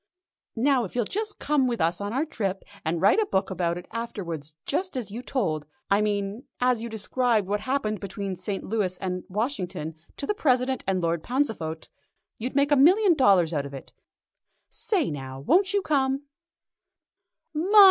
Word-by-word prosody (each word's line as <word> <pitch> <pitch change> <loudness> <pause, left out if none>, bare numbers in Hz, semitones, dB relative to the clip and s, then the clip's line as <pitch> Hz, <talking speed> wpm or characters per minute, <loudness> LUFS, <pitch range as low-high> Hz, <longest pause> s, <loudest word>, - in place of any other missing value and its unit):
Now 260 +1 +3
if 195 - -7
you'll 240 -3 +1
just 425 - -3
come 285 -3 +2
with 235 -3 -1
us 170 +3 +1
on 205 0 -2
our 270 +6 0
trip, 195 -10 -3 0.2
and 165 +1 0
write 200 - +5
a 430 - +1
book 190 - 0
about 175 -2 0
it 175 - -8
afterwards 175 -10 -5
just 360 0 -1
as 230 -5 -4
you 230 +4 -5
told 160 - -1 0.2
I 200 +1 +5
mean 205 +2 -1
as 250 -2 +2
you 235 - -4
described 225 0 +1
what 205 +1 0
happened 215 -3 -1
between 200 0 -4
the 180 - -9
St. 195 +1 -3
Louis 195 -4 -1
and 180 -1 -3
Washington, 185 - -2 0.2
to - - -3
the 420 - +1
President 260 - +1
and 190 -1 +1
Lord 165 -1 +1
Pauncefote, 215 - -2 0.5
you'd 250 +4 -4
make 285 +1 +3
a - - +7
million 365 +8 +6
dollars 195 - +4
out 140 -2 -1
of 140 - -9
it. 135 - -10 0.8
Say 365 - 0
now, 135 -2 -6
won't 370 - +3
you 405 -1 +1
come?" 275 -1 +1
215 Hz, 180 wpm, -26 LUFS, 180-265 Hz, 0.8 s, a